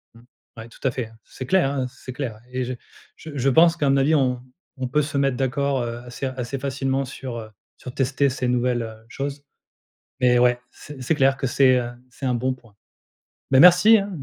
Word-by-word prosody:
Mmh. 115 - -16 0.4
Ouais, 115 0 -8
tout - - -18
à - - +1
fait, 115 -2 -5
c'est 130 - -9
clair, 180 -1 +2
hein, 135 -2 -1
c'est 130 +1 -10
clair 120 -6 -5
et 130 0 -2
je 125 +1 -4 0.4
je 160 - -10
je 135 0 +1
pense 165 +5 +5
qu'à 145 -4 +1
mon 135 - +3
avis, 140 +4 +3
on 125 -4 +1 0.4
on 130 -1 -3
peut 150 +4 +1
se 145 -1 -3
mettre 135 -2 +1
d'accord, 135 +1 0
heu, 120 0 -4
assez 125 +2 -6
assez 130 +1 -4
facilement 135 0 -1
sur, 130 -2 -7
heu, 110 -1 -9 0.3
sur 125 - -9
tester 135 +1 +1
ces 130 -1 -2
nouvelles, 125 0 +1
heu, 110 0 -10
choses, 140 +2 -5 0.8
mais 125 -1 +4
ouais, 125 0 +3
c 145 -1 -12
c'est 130 +6 0
clair 135 -1 +3
que 135 - -2
c'est, 130 +1 +4
heu, 120 -1 -4 0.2
c'est 130 +2 -8
un 125 -1 +1
bon 130 +2 0
point. 115 -5 -19 0.8
Bah, 130 - +6
merci, 180 +7 +8
hein, 200 0 -3
130 Hz, 215 wpm, -23 LUFS, 125-140 Hz, 0.8 s, merci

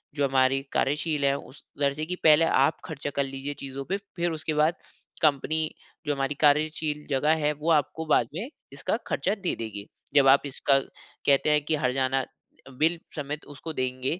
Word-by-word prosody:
जो 145 -2 +2
हमारी 135 0 +3
कार्यशील 150 +1 +1
है, 140 0 +3
उस 140 - -12 0.2
दर्जे 145 +2 0
की 180 - -3
पहले 155 +1 +6
आप 140 -1 +3
खर्चा 145 -4 -4
कर 140 - +2
लीजिए 135 +1 -5
चीज़ों 135 -1 -7
पे 195 - -1 0.2
फिर 175 -1 0
उसके 155 0 -3
बाद, 155 +3 +3 0.5
कंपनी 155 +1 +2 0.4
जो 145 - +1
हमारी 135 +1 -1
कार्यशील 150 0 +2
जगह 150 +3 +3
है, 150 - +3
वो 150 +3 -1
आपको 160 +1 +1
बाद 135 -6 +3
में 220 - -4 0.2
इसका 140 +9 -1
खर्चा 180 +8 0
दे 195 -4 -1
देगी। 105 -3 -6 0.3
जब 140 -2 +6
आप 135 +1 +7
इसका 140 0 +2
कहते 140 +1 -1
हैं 150 0 +4
कि 155 - +2
हर्जाना 130 -1 +1
अ, 135 - -16
बिल 160 +6 +1 0.2
समेत 150 0 -4
उसको 145 +3 -7
देंगे 130 +5 -2
145 Hz, 180 wpm, -27 LUFS, 135-155 Hz, 0.5 s, आप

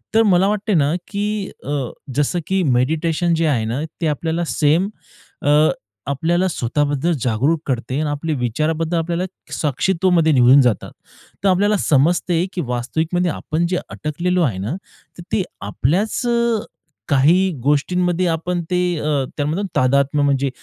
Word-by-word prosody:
तर 225 - +6
मला 190 -2 +4
वाटत 210 +1 -2
आहे 205 - +3
ना 145 0 +2
की 205 0 -2
अ, 140 -2 -2 0.3
जसं 145 +5 +1
की 190 0 +1
मेडिटेशन 160 +6 +1
जे 165 0 +1
आहे 120 -7 +1
ना 120 +6 -2 0.2
ते 165 - +1
आपल्याला 160 +3 -1
सेम 155 +7 +2 0.6
अ, - - +3 0.6
आपल्याला 170 +6 +1
स्वतःबद्दल 145 +1 0
जागरूक 130 +8 +1
करते 130 +1 -2
आणि 155 -1 -1
आपले 150 +2 -2
विचाराबद्दल 155 +7 -1
आपल्याला 170 +2 -1 0.3
साक्षित्वामध्ये 170 +2 +1
निघून 130 +1 +6
जातात. 120 -6 0 0.5
तर 200 - +4
आपल्याला 205 +3 +3
समजते 170 +3 +2
की 180 - -2
वास्तविकमध्ये 160 +9 -1
आपण 155 +3 -2
जे 180 - 0
अटकलेलो 175 +4 -1
आहे 115 - 0
ना 105 - -3 0.4
तर 175 - -9
ते 205 - +1 0.2
आपल्याच 155 - 0
अ, 235 -1 +2 0.5
काही 165 +7 +4
गोष्टींमध्ये 175 +5 +1
आपण 170 +2 -1
ते 180 - +2 0.2
अ, 145 -3 0
त्यामधून 155 +7 -1
तादात्म 140 +3 +2
म्हणजे 140 -1 +1
160 Hz, 145 wpm, -20 LUFS, 140-180 Hz, 0.6 s, तर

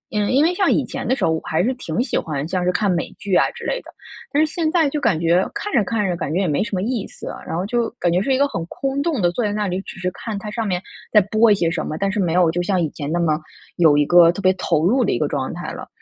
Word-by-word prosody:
嗯， 210 -1 +1
因 270 +3 +4
为 340 +3 +3
像 385 +2 +2
以 - - +2
前 - - -5
的 260 - +2
时 - - 0
候 - - +2
我 160 - -1
还 160 +2 0
是 250 +6 +1
挺 170 -10 -4
喜 - - -3
欢 150 -2 -2
像 180 +1 -1
是 180 - +2
看 200 +1 +1
美 170 -1 -2
剧 200 -1 -5
啊 - - +4
之 - - -10
类 - - -1
的， - - -15 0.4
但 300 +2 +3
是 310 - -7
现 330 -3 0
在 330 -3 +3
就 290 +1 -2
感 210 - +2
觉 170 +2 +3
看 415 - -4
着 235 - +4
看 210 0 -1
着 180 - -1
感 160 - -4
觉 170 - 0
也 190 - 0
没 150 +2 +1
什 215 -2 -4
么 185 - -1
意 235 -2 -2
思 - - -10
啊。 - - -9
然 - - -4
后 180 - -1
就 235 +2 0
感 175 - +1
觉 180 - +2
是 265 +6 +1
一 - - +1
个 280 +1 +3
很 165 -12 -4
空 275 +7 -2
洞 300 -4 -1
地 175 -3 +2
坐 235 - -2
在 210 - 0
那 210 0 -1
里， 185 +1 -2
只 - - -10
是 185 -1 -2
看 220 +2 -6
它 210 +1 -6
上 225 0 -2
面 180 -2 0 0.3
在 215 - +7
播 215 +3 +3
一 - - +6
些 170 -4 0
什 - - -2
么， 155 - -4
但 195 +3 0
是 210 - -2
没 175 -4 +1
有 175 -2 +4
就 175 +2 -1
像 185 +1 0
以 165 - +1
前 145 -1 -5
那 170 - 0
么 155 -3 +1 0.4
有 160 -4 +5
一 145 - +3
个 175 +1 +6
特 175 - -8
别 185 0 +5
投 170 -4 0
入 250 +6 +3
的 - - +1
一 - - 0
个 - - 0
状 - - -2
态 - - -5
了。 - - -8
190 Hz, 355 characters per minute, -21 LUFS, 175-235 Hz, 0.4 s, 在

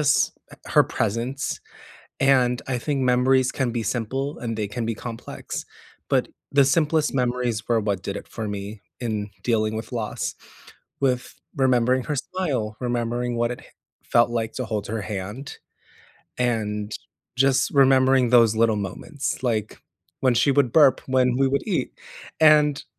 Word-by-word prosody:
just 150 0 +3 0.2
h - - -14 0.2
her - - +9
presence, 115 +6 -2 0.6
and 130 -2 +3 0.2
I - - +1
think 140 -3 0
memories 130 +1 +3
can 130 -3 +1
be 120 -1 -2
simple 130 +6 -2
and 115 -2 -3
they 105 -1 -1
can 120 -2 -2
be 115 - -1
complex, 115 0 -7 0.4
but - - +2 0.3
the 140 0 +5
simplest 155 +2 +2
memories 125 -3 0
were 115 -2 +3
what 100 -3 -1
did 100 - -3
it - - -8
for 110 -2 -3
me 100 +1 -6 0.3
in 105 -2 -2 0.2
dealing 110 -2 +1
with 110 +4 -6
loss, 115 -3 -3 0.8
with 125 -2 0 0.3
remembering 125 0 +3
her 150 - -1
smile, 145 -5 -2 0.2
remembering 120 0 -1
what 120 0 +1
it - - -15 0.5
felt, 120 0 +5
like, 115 -1 -2
to 130 - -3
hold 105 -2 -3
her 110 0 -3
hand, 105 +6 -6 0.8
and 105 -4 -1 0.4
just 130 0 +3
remembering 130 -2 +5
those 115 -3 +5
little 115 -1 +3
moments, 140 - -5
like 110 -4 -1 0.5
when 125 - +4
she 125 +4 +3
would 135 -4 +2
burp, 140 -5 +5
when 130 -1 +2
we 135 0 +3
would 140 +1 -1
eat, - - -1 0.5
and 150 -2 +5
125 Hz, 155 wpm, -24 LUFS, 115-135 Hz, 0.8 s, her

